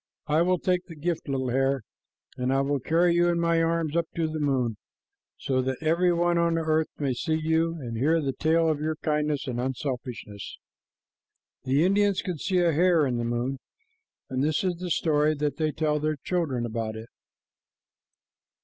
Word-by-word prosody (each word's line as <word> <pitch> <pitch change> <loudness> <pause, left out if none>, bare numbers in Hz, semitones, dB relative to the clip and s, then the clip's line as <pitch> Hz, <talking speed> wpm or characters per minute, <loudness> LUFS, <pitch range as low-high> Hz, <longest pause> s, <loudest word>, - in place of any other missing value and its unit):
I 155 +2 +2
will 180 +1 +3
take 180 +1 0
the 165 - -10
gift, 160 0 -3
little 130 -2 -1
hare, 135 0 +1 0.5
and 125 +1 -1
I 135 0 +2
will 140 0 0
carry 170 +6 +2
you 175 0 +3
in 170 0 +1
my 170 0 +2
arms 165 -2 0
up 170 -1 +1
to 165 -1 0
the 155 0 -4
moon, 130 -7 0 0.6
so 130 -1 0
that 130 0 -2
every 170 +3 +2
one 175 0 +2
on 170 0 +2
the 165 - 0
earth 155 0 +1
may 140 -3 0
see 160 +6 -1
you 160 +1 +1
and 120 -5 -5
hear 155 +8 +2
the 140 -3 -1
tale 165 +3 +2
of 155 -2 +1
your 155 +1 -1
kindness 150 -2 -1
and 120 -3 -3
unselfishness." 125 -5 -5 1.1
The 135 +5 +3
Indians 200 0 +2
can 180 -5 -4
see 190 +3 0
a 170 -1 +3
hare 170 -1 +4
in 125 -3 -1
the 120 - -1
moon, 120 +3 -2 0.7
and 130 +1 -1
this 155 +3 +1
is 180 -2 0
the 180 +1 -5
story 155 -2 +2
that 145 -1 -2
they 155 -1 0
tell 150 0 0
their 155 0 -1
children 150 -10 -1
about 110 -1 -3
it. 110 +1 -9
155 Hz, 190 wpm, -26 LUFS, 135-170 Hz, 1.1 s, hare